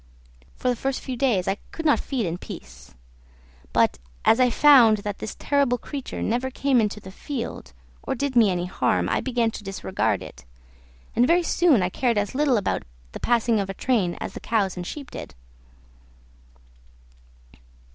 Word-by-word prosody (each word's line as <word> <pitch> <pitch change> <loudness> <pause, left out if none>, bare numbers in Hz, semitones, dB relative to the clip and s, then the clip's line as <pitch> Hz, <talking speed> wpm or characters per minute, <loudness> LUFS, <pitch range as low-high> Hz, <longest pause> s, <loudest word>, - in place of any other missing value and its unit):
For - - -4
the 250 - +2
first 270 +2 -2
few 260 - -5
days 235 -8 +1
I 195 - 0
could 325 - -6
not 295 - +4
feed 255 -6 -2
in 170 +1 -3
peace; 65 0 -11 0.8
but - - +2 0.3
as 225 - +5
I 250 -1 +5
found 245 -5 +6
that 205 -1 -4
this 220 - -6
terrible 280 -4 +1
creature 275 +1 -6
never 245 +4 0
came 265 -1 +2
into 210 -1 -2
the 190 -2 -11
field, 240 +4 -6 0.3
or 265 - -3
did 280 +1 -2
me 225 -4 +6
any 180 -1 -1
harm, 180 - 0
I - - 0
began 240 -3 0
to 215 - -8
disregard 195 -1 -1
it, 65 - -12 0.7
and 245 +1 +4
very 345 +2 +4
soon 320 - +3
I 180 - 0
cared 235 +3 0
as 205 +3 -1
little 275 -2 +2
about 200 - -1 0.3
the - - -7
passing 235 -2 +2
of 195 -1 -2
a 195 - -5
train 205 -9 0
as - - -5
the - - -7
cows 205 -5 0
and 180 -1 -6
sheep 285 -3 -7
did. - - -8
235 Hz, 175 wpm, -24 LUFS, 195-265 Hz, 0.8 s, found